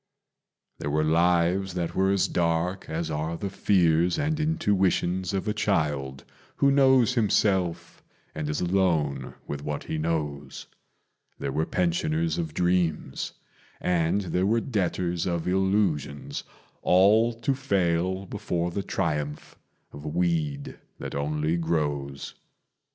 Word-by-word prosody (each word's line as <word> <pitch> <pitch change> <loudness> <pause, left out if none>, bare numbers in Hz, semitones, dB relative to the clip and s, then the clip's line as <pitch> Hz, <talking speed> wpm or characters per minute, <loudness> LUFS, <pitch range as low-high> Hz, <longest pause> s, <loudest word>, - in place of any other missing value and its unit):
There 75 - -3
were 75 +1 +1
lives 85 +3 +2
that 85 -2 -2
were 95 +1 +2
as 100 -1 +2
dark 85 +2 -1
as 80 0 -2
are 80 +2 -2
the 100 +1 -4
fears 85 -3 +3
and 155 +1 0
intuitions 95 - +1
Of 100 +1 -2
a 105 - +1
child 75 -11 -1 0.3
who 140 - +3
knows 130 -3 +5
himself 95 -6 +1 0.3
and 75 -1 -4
is 75 - -1
alone 85 -8 0
with 70 0 -5
what 75 -1 -3
he 80 - -3
knows; 75 -4 -3 0.7
There 70 - -3
were 80 +3 -1
pensioners 170 -1 0
of 165 -2 -4
dreams 85 -6 0 0.5
and 85 +2 +1
there 90 0 0
were 115 +3 +3
debtors 90 -7 -1
of 85 -1 -2
illusions, 95 -7 0 0.4
All 105 +6 +5
to 135 +4 0
fail 95 -7 0
before 90 -3 -2
the 100 - -2
triumph 75 -6 -3 0.4
of 70 - -10
a - - -6
weed 75 -4 -1 0.2
that - - -6
only 75 +3 0
grows. 75 -4 -2
85 Hz, 130 wpm, -26 LUFS, 75-100 Hz, 0.7 s, knows